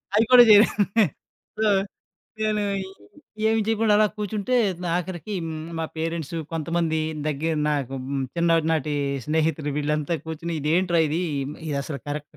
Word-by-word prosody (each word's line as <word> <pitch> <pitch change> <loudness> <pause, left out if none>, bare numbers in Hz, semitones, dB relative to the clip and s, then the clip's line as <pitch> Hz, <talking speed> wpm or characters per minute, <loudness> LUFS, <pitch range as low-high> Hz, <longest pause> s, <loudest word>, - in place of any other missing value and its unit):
అది 220 +2 +4
కూడా 250 -1 +10
చేయ్ 210 0 +9 1.0
సో, 220 - +2 0.7
నేనూ 215 -1 +1 0.8
ఈ - - -1
ఏమి 225 0 +2
చెయకుండా 220 -1 +2
అలా 215 0 +5
కూర్చుంటే, 210 +3 -2 0.4
ఆఖరికీ 180 +2 -4
హ్మ్. 160 -1 -5 0.2
మా 165 - -1
పేరెంట్స్, 165 -1 -3 0.2
కొంతమందీ 165 0 -1 0.3
దగ్గర 155 +2 -1 0.2
నాకు 140 -3 -2
హ్మ్, 135 0 -2
చిన్ననాటీ 165 -3 +1 0.3
స్నేహితులు, 155 -1 0
వీళ్ళంతా 150 +2 -1
కూర్చుని, 165 +1 -5
"ఇదేంట్రా 170 +4 +2
ఇదీ, 155 +3 -1 0.5
ఇదసలు 140 0 -3
కరక్ట్ 150 +1 -6
165 Hz, 125 wpm, -24 LUFS, 150-195 Hz, 1.0 s, కూడా